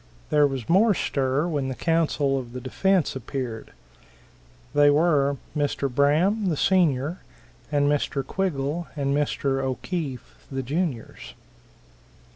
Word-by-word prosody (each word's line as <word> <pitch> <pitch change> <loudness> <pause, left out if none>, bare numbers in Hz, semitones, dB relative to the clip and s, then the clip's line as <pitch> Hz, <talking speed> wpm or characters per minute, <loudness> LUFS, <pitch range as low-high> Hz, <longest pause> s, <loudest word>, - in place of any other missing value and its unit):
There 150 -1 +5
was 135 -5 -5
more 200 +4 +4
stir 135 +2 0
when 145 -5 -1
the 130 - -3
counsel 150 -4 +1
of 120 -2 -9
the 125 - -5
defense 180 +7 +1
appeared. 125 -3 -5 1.0
They 145 0 +6
were 145 -2 +3 0.2
Mr. 140 -2 -1
Braham, 170 - +2
the 155 - -1
senior, 165 -3 +2 0.5
and 145 -1 +2
Mr. 145 -1 0
Quiggle 170 -3 -2
and 140 -1 0
Mr. 140 -2 0
O'Keefe, 135 0 -4
the 135 0 -3
juniors. 145 -3 -4
145 Hz, 120 wpm, -25 LUFS, 135-165 Hz, 1.0 s, They